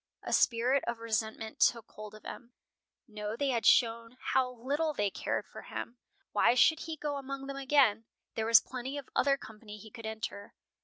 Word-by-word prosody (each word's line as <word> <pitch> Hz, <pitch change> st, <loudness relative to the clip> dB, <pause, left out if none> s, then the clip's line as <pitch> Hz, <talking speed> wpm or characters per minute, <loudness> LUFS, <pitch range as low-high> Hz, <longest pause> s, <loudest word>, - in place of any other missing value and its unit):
A -, -, -3 dB
spirit 250 Hz, +3 st, +3 dB
of 235 Hz, 0 st, -1 dB
resentment 220 Hz, -1 st, -3 dB
took 230 Hz, -2 st, +2 dB
hold 215 Hz, 0 st, -10 dB
of 215 Hz, -, -15 dB
him. 240 Hz, 0 st, -9 dB, 0.5 s
No, 210 Hz, -1 st, -5 dB
they 280 Hz, +3 st, 0 dB
had 235 Hz, -3 st, +1 dB
shown 230 Hz, 0 st, +3 dB
how 260 Hz, -1 st, +1 dB
little 285 Hz, +6 st, -2 dB
they 205 Hz, -3 st, 0 dB
cared -, -, -2 dB
for -, -, -11 dB
him. 240 Hz, +1 st, -7 dB, 0.3 s
Why 240 Hz, -, +4 dB
should 315 Hz, +5 st, +5 dB
he 325 Hz, -1 st, -5 dB
go 290 Hz, -1 st, -3 dB
among 275 Hz, 0 st, -6 dB
them 275 Hz, 0 st, -6 dB
again? 265 Hz, -6 st, +3 dB, 0.3 s
There 220 Hz, 0 st, -2 dB
was 230 Hz, 0 st, +8 dB
plenty 260 Hz, +2 st, -6 dB
of 280 Hz, -, -7 dB
other 275 Hz, +1 st, +3 dB
company 215 Hz, -3 st, -11 dB
he 220 Hz, +1 st, -13 dB
could 230 Hz, -3 st, -8 dB
enter. 220 Hz, -2 st, -6 dB
235 Hz, 190 wpm, -31 LUFS, 220-275 Hz, 0.5 s, was